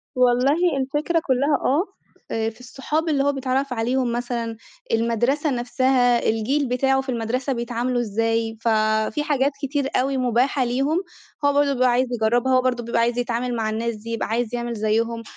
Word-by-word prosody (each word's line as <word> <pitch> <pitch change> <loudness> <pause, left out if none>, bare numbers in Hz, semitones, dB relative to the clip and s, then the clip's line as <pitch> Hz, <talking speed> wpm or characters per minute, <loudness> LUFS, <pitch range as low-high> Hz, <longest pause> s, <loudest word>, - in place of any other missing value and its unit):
والله 270 +6 +3
الفكرة 295 +5 0
كُلَّها 275 +2 +2
آه، 295 +7 +3 0.5
آآ 225 0 0
في 220 - -16
الصّحاب 300 +6 -3
اللي 280 -2 +2
هو 285 - +3
بيتعرَّف 265 0 -1
عليهم 245 +1 0
مثلًا، 235 -1 -3 0.3
المدرسة 240 +6 +1
نفسها، 245 -1 +2
الجيل 260 +6 0
بتاعُه 265 +2 +2
في 265 - -9
المدرسة 250 +3 -1
بيتعاملوا 240 +1 -1
إزاي، 225 +1 -1
ف - - -3 0.4
في 295 - -2
حاجات 280 -1 +1
كتير 275 0 -1
أوي 270 +1 +1
مُباحة 255 +2 +1
ليهم، 270 +7 0 0.5
هو 285 - +4
برضو 285 0 +3
بيبقى 255 0 +3
عايز 250 +2 +2
يجرَّبها، 240 +3 +2
وبرضو 255 -2 0
بيبقى 235 0 0
عايز 235 +1 +1
يتعامل 245 0 -1
مع 220 -2 -1
الناس 225 +1 -2
دي، 215 +2 -10
يبقى 230 - -2
عايز 235 +1 -1
يعمل 240 0 -3
زيهم، 230 +2 -1
250 Hz, 170 wpm, -22 LUFS, 235-270 Hz, 0.5 s, هو